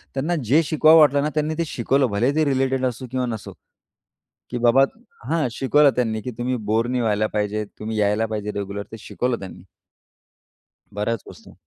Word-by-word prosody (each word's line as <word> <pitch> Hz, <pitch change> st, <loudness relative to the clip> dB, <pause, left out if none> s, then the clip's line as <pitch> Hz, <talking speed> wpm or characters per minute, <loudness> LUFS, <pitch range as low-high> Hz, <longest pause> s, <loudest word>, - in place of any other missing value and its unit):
त्यांना 150 Hz, +6 st, 0 dB
जे 140 Hz, +9 st, +4 dB
शिकवावं 155 Hz, +1 st, +5 dB
वाटलं 145 Hz, -2 st, +5 dB
ना 150 Hz, -, 0 dB
त्यांनी 155 Hz, +1 st, 0 dB
ते 170 Hz, -, 0 dB
शिकवलं 135 Hz, +1 st, +1 dB
भले 115 Hz, +6 st, +1 dB
ते 155 Hz, 0 st, +2 dB
रिलेटेड 135 Hz, -1 st, 0 dB
असो 125 Hz, +1 st, -3 dB
किंवा 130 Hz, -1 st, -1 dB
नसो 115 Hz, -3 st, -6 dB, 1.0 s
की 125 Hz, -, -2 dB
बाबा 120 Hz, +3 st, +5 dB, 0.5 s
हां, 160 Hz, -4 st, +1 dB
शिकवलं 140 Hz, +4 st, +3 dB
त्यांनी 110 Hz, -3 st, -1 dB
की 125 Hz, -, -5 dB
तुम्ही 125 Hz, +1 st, -1 dB, 0.2 s
बोर 115 Hz, +2 st, +2 dB
नाही 125 Hz, 0 st, -1 dB
व्हायला 110 Hz, -2 st, +1 dB
पाहिजे 105 Hz, 0 st, -1 dB
तुम्ही 110 Hz, 0 st, -4 dB
यायला 105 Hz, +2 st, +2 dB
पाहिजे 105 Hz, -1 st, -4 dB
रेग्युलर, 100 Hz, 0 st, -5 dB
ते 115 Hz, -, -7 dB
शिकवलं 120 Hz, +3 st, -2 dB
त्यांनी. 90 Hz, -2 st, -10 dB, 1.3 s
बऱ्याच 105 Hz, +1 st, -2 dB
वस्तू. -, -, -14 dB
125 Hz, 175 wpm, -22 LUFS, 110-140 Hz, 1.3 s, शिकवावं